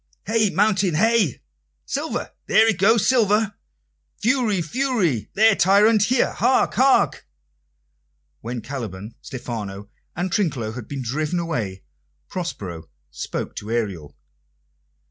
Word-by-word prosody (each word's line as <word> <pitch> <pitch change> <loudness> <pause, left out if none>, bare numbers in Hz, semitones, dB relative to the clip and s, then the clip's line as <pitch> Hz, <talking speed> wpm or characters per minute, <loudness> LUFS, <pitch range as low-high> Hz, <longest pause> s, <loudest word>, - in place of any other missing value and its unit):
"Hey, 220 0 +2
Mountain, 195 -4 +2
hey!" 225 +6 +2 0.4
"Silver! - - -3 0.2
There 220 +1 +5
it 220 -6 +1
goes, 215 +2 +4
Silver!" 215 -4 +3 0.7
"Fury, 230 -4 +1
Fury! 180 - 0
There, 220 0 +5
Tyrant, 205 +3 +4
there! 255 -1 +2
Hark, 260 - +2
hark!" 265 +1 +3 1.1
When 120 +1 -5
Caliban, 110 -6 -6
Stephano, 105 -5 -6 0.3
and 175 +2 -2
Trinculo 140 - -1
had 115 -1 -8
been 140 -2 -5
driven 150 +8 -2
away, 115 - -3 0.5
Prospero 95 - -6 0.2
spoke 75 - -5
to 105 - -6
Ariel. 100 -12 -3
175 Hz, 110 wpm, -22 LUFS, -, 1.1 s, There